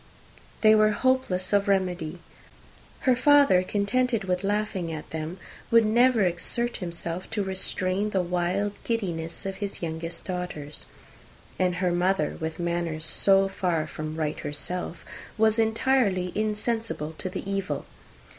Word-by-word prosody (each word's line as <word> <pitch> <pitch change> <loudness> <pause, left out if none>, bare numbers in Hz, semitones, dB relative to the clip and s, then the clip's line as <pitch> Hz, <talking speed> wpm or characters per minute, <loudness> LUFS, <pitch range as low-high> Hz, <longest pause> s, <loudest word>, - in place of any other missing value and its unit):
They 215 -1 +7
were 215 0 +5
hopeless 210 -7 +1
of 200 0 +3
remedy. 180 -4 0 0.8
Her 255 -2 +4
father, 280 -7 +5
contented 215 +4 0
with 180 0 -1
laughing 200 -4 -1
at 155 -1 -7
them, 160 +3 -4 0.3
would 230 -1 +6
never 235 +1 +4
exert 190 +7 0
himself 170 -1 -5
to 210 -2 -1
restrain 190 +1 -1
the 190 -3 +1
wild 180 +3 0
giddiness 175 -7 -3
of 195 0 -4
his 200 -3 -5
youngest 165 +1 -5
daughters; 180 -6 -5 0.7
and 180 -1 +2
her 180 0 +1
mother, 175 -2 +1
with 160 0 -4
manners 170 -2 -2
so 195 +4 +4
far 175 -5 -1
from 155 0 -6
right 155 -2 -2
herself, 165 +4 -4 0.3
was 220 +1 +3
entirely 220 -5 +2
insensible 215 -6 -1
of 185 - -3
the - - -5
evil. 195 -8 -2
185 Hz, 135 wpm, -26 LUFS, 170-215 Hz, 0.8 s, They